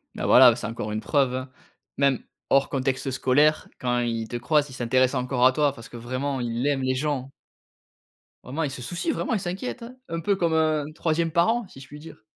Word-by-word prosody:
Bah, - - -4
voilà, 125 -2 +8
c'est 120 -2 -6
encore 110 -2 -5
une 110 - -2
preuve, 135 -4 +1
hein. 130 +1 -5 0.5
Même 140 -2 +2 0.3
hors 135 0 +3
contexte 135 0 -1
scolaire, 145 +4 +2
quand 125 -1 0
il 115 -2 -2
te 120 - -3
croise, 145 +4 +1
il 130 - -11
s'intéresse 130 +2 +1
encore 125 -1 +1
à 130 - +7
toi. 145 0 +1
Parce 115 -4 -12
que, 120 - -9
vraiment, 130 +3 -3
il 120 +1 -2
aime 140 -2 +1
les 130 0 0
gens. 135 -1 -2 1.1
Vraiment, 140 +6 -4
il 150 - 0
se 130 -2 -7
soucie, 175 - -3
vraiment 260 - -1
il 220 - +1
s'inquiète, 190 +7 -5
hein. 245 +2 -9
Un 165 - -3
peu 195 +4 +1
comme 170 -3 0
un 155 -2 +2
3e 165 0 0
parent 215 +6 +2
si 135 - -14
je 135 - -12
puis 150 - -11
dire. 160 -7 -13
135 Hz, 220 wpm, -25 LUFS, 125-155 Hz, 1.1 s, voilà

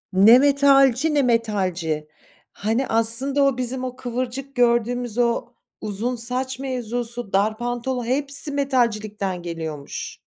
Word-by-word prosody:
Ne 210 +6 +7
metalci 280 +1 +4
ne 285 - +3
metalci. 185 - -1 0.4
Hani 225 +6 -1
aslında 230 +6 +2
o 275 -2 +2
bizim, 255 +1 -3
o 255 0 -6
kıvırcık 255 +2 -5
gördüğümüz 240 -1 +1
o 235 0 +1 0.4
uzun 215 +4 -2
saç 255 +2 -1
mevzusu, 245 -3 -2
dar 210 +3 +1
pantolon 245 +1 -3
hepsi 280 +3 -1
metalcilikten 215 -9 -1
geliyormuş. 160 -4 -6
245 Hz, 115 wpm, -22 LUFS, 215-260 Hz, 0.4 s, Ne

